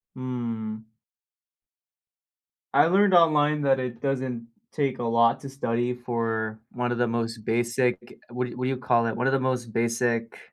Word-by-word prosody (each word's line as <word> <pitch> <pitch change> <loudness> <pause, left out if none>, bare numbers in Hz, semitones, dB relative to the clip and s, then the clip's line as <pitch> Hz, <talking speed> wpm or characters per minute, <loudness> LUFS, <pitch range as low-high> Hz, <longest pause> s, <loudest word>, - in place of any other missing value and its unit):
Mm. 115 -4 -5 1.8
I 145 +2 +6
learned 195 +3 +4
online 150 -3 +4
that 135 -1 +3
it 120 -2 -4
doesn't 130 -4 -2 0.3
take 140 -5 -1
a - - -2
lot 115 0 +3
to 140 - -8
study 125 -2 -1
for 115 -3 -2
one 120 0 -2
of 120 - -2
the 120 - +2
most 115 -1 -3
basic, 120 +1 -1
what 125 +1 -2
what 125 +1 -3
do - - +1
you 135 - -1
call 115 -2 +2
it, 115 - -2
one 125 - -1
of 135 - +2
the 135 - +3
most 125 -3 -2
basic 115 0 0
120 Hz, 165 wpm, -26 LUFS, 115-130 Hz, 1.8 s, I